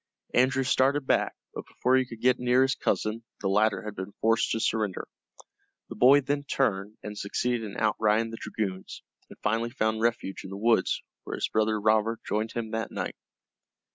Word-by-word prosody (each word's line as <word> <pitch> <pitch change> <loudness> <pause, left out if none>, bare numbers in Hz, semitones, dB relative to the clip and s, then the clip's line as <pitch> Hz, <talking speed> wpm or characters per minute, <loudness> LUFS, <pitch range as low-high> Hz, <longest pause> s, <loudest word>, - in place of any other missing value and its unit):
Andrew 130 +2 +3
started 135 +2 +2
back, - - +1 0.2
but - - -7
before 125 +1 +1
he 130 0 +3
could 115 -2 -10
get 125 0 +3
near 125 +1 +4
his 135 0 +2
cousin 110 -1 -1 0.2
the 100 - -1
latter 105 +2 +2
had 105 -1 -5
been 95 +1 -7
forced 115 +1 +1
to 115 - 0
surrender. 110 -4 -1 0.8
The - - -7
boy 140 +3 +6
then 145 +1 -1
turned, 105 -7 -1
and 105 0 -6
succeeded 120 +4 -1
in 105 -3 -7
outriding 110 +1 +1
the 115 - -6
dragoons, 95 -4 -4 0.3
and - - -13
finally 115 +2 0
found 110 -3 -1
refuge 115 -4 -1
in - - -8
the 95 - -6
woods, 115 +3 +2 0.2
where - - -5
his - - -2
brother 110 0 +1
Robert 110 +2 +2
joined 110 +2 -1
him 115 -2 -4
that 115 0 -2
night. - - -4
110 Hz, 185 wpm, -27 LUFS, 105-125 Hz, 0.8 s, boy